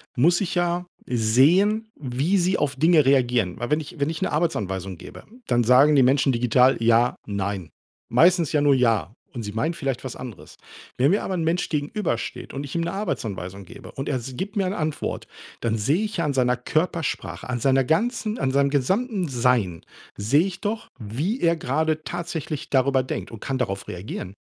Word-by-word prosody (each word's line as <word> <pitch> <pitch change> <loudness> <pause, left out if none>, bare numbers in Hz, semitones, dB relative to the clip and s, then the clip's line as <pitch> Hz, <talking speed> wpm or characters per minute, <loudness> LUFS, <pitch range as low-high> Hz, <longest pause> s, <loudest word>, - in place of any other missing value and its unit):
muss 170 +9 +3
ich 190 - -2
ja 175 0 0 0.2
sehen, 165 - +3
wie 145 +8 0
sie 185 +1 +2
auf 145 -2 -1
Dinge 160 +1 +4
reagieren. 125 -8 +2
Weil 120 - -3
wenn 150 - +3
ich 155 +1 -9
wenn 140 - +1
ich 160 -1 -5
'ne - - 0
Arbeitsanweisung 95 - -2
gebe, - - -11 0.2
dann 120 -1 +2
sagen 130 +6 +6
die 135 - +6
Menschen 135 +2 +3
digital: 125 +2 +3
„Ja, 115 +1 +3
nein“. 100 -4 -3 0.4
Meistens 165 +5 +4
ja 150 - +2
nur 145 -1 +5
„ja“. 115 -6 +1 0.2
Und 120 -3 -5
sie 105 -1 -6
meinen 150 +10 0
vielleicht 135 -6 -3
was 130 -2 -6
anderes. 120 -7 -10 0.4
Wenn 135 +5 +4
mir 205 - +1
aber 190 - -2
'n 165 -3 -1
Mensch 170 +2 0
gegenübersteht 150 - -3
und 140 +1 -4
ich 140 - -8
ihm 170 - +1
'ne 170 - -2
Arbeitsanweisung 100 - -4
gebe 90 - -12
und 135 - -4
er 140 - 0
s 125 +1 -7
gibt 200 - -4
mir 195 - +2
eine 185 +2 -2
Antwort, 155 -4 -3 0.4
dann 115 -1 0
sehe 145 - +1
ich 215 -1 -4
ja 170 - 0
an 145 - 0
seiner 125 -2 +2
Körpersprache, 160 +5 -2
an 125 -2 -3
seiner 135 0 +3
ganzen 220 - 0
an 130 - 0
seinem 140 +1 +3
gesamten 190 - 0
Sein 120 -9 +1 0.3
sehe 140 - +3
ich 190 -2 -5
doch, 215 +2 -3
wie 145 - -2
er 170 -1 +3
gerade 155 +1 -1
tatsächlich 165 -4 -5
darüber 135 -1 +2
denkt 130 - -5
und 115 - -9
kann 135 +4 -3
darauf 100 -7 -3
reagieren. 90 +1 -6
140 Hz, 195 wpm, -24 LUFS, 120-170 Hz, 0.4 s, sagen